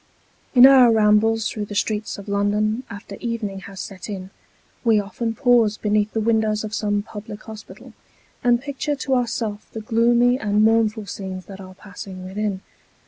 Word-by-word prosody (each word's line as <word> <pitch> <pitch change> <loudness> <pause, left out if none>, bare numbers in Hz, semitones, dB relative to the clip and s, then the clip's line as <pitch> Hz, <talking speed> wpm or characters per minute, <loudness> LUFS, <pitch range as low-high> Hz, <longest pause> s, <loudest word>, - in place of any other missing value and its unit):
IN 250 0 +10
our 260 -3 +8
rambles 220 +1 +3
through 210 -1 -4
the 205 - -8
streets 210 +1 -1
of 200 - -10
London 205 +3 0
after 205 0 -9
evening 225 -5 -4
has 195 0 -11
set 195 +1 -7
in, 190 -2 -6 0.5
we 225 -3 +4
often 225 +3 -4
pause 230 -3 +3
beneath 210 0 0
the 225 - 0
windows 220 -1 +1
of 215 0 -6
some 205 -1 0
public 210 -1 -9
hospital, 220 -1 -11 0.5
and 240 -1 +4
picture 285 +1 -3
to 270 -1 -2
ourself 225 -4 -2
the 225 - -5
gloomy 240 +3 +3
and 210 -1 +1
mournful 220 -1 +2
scenes 190 -1 -6
that 195 -1 -10
are 185 0 -11
passing 185 -1 -10
within. 200 0 -3
215 Hz, 165 wpm, -22 LUFS, 205-230 Hz, 0.5 s, IN